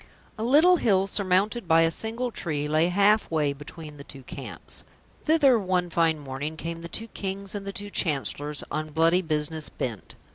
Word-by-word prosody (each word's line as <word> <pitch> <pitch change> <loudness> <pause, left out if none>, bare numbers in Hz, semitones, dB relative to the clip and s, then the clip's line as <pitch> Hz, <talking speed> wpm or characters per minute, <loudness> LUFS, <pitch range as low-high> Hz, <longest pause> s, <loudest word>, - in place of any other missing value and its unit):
A 220 - -4
little 310 +9 +6
hill 195 - +3
surmounted 195 +2 +1
by 165 0 +5
a 165 0 +3
single 230 +7 -1
tree 150 -8 -2
lay 155 +2 +3
half 200 +4 +3
way 150 -3 +1
between 150 +1 -10
the 140 - -9
two 135 -1 -11
camps. - - -6 0.4
Thither 290 -6 +5
one 180 -3 0
fine 165 -1 +2
morning 145 +2 -5
came 165 +1 -5
the 170 - -6
two 225 +5 -4
Kings 195 -1 -5
and 200 -1 -5
the - - -2
two 205 +1 -7
Chancellors 145 -3 -2
on 155 0 -2
bloody 165 +3 +4
business 155 -1 -2
bent. 115 -6 -5
170 Hz, 180 wpm, -26 LUFS, 155-205 Hz, 0.4 s, little